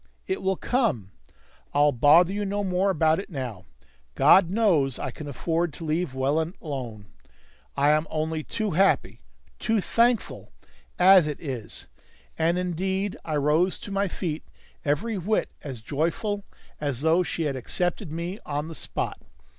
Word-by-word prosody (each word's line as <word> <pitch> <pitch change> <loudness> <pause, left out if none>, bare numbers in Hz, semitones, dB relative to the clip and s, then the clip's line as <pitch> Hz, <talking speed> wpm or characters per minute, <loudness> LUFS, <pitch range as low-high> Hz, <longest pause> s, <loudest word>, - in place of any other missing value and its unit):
It 190 - -2
will 190 0 +1
come. 195 - 0 0.6
I'll 145 0 +5
bother 155 +8 +5
you 205 +1 -2
no 205 +1 -1
more 190 +1 +1
about 160 -3 +3
it 195 - -7
now. 125 - -5 0.5
God 185 -3 +6
knows 175 - +2
I - - -4
can 155 - -9
afford 165 +4 -1
to 165 - -8
leave 155 -2 -1
well 140 +4 +1 0.2
alone! 125 -9 -6 0.7
I 145 +1 +4
am 155 +1 +2
only 160 0 -2
too 215 +4 -2
happy 195 +4 +2 0.4
too 225 -1 +1
thankful 235 +3 +1 0.5
as 185 -2 +7
it 150 - -4
is!" 125 -7 -6 0.5
And 165 +2 +1
indeed 190 +2 -1
I 155 - -3
rose 150 +6 +2
to 205 - -9
my 200 0 +1
feet 165 -3 -4 0.4
every 195 +9 0
whit 210 +5 0
as 130 -6 -7
joyful 170 - -2 0.3
as 140 -4 -2
though 160 +3 +4
she 175 -2 -2
had 145 -3 -1
accepted 175 - -2
me 170 +5 -4
on 150 +2 -3
the - - -7
spot. - - -4
165 Hz, 155 wpm, -26 LUFS, 145-190 Hz, 0.7 s, as